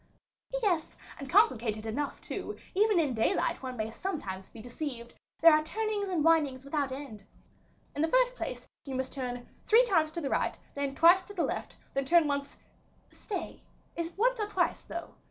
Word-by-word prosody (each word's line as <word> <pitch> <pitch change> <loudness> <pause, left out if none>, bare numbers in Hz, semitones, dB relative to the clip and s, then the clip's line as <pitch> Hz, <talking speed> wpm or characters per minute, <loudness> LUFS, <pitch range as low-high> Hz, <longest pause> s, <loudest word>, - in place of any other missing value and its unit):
"Yes, 350 -6 0 0.2
and 275 -2 -7
complicated 235 - +3
enough 280 +6 -3
too; - - -5 0.2
even 415 -1 +4
in 290 -6 +1
daylight 230 - +1
one 255 -2 -5
may 220 0 -2
sometimes 210 - -5
be 230 - -13
deceived, 240 0 -6 0.3
there 330 0 +9
are 305 - +5
turnings 420 +3 -2
and 345 -5 0
windings 290 -5 +3
without 280 -1 -1
end: 260 -7 -7 0.7
in 290 - -1
the 320 - +3
first - - +3
place, - - -5 0.2
you 270 -2 -5
must 260 0 -3
turn 245 -2 -4 0.2
three 465 +3 +6
times 325 -9 +2
to 340 - -3
the 275 - -2
right, - - 0 0.2
then 280 -1 -2
twice 345 +5 +7
to 405 +3 -12
the 345 - +1
left, - - -3 0.2
then 275 0 0
turn 335 +2 +5
once 280 -1 -3 0.5
stay, 385 -5 -6 0.3
is 335 0 -3
it - - -28
once - - +2
or 420 - 0
twice, 420 - 0
though? 340 0 -7
305 Hz, 185 wpm, -30 LUFS, 260-375 Hz, 0.7 s, there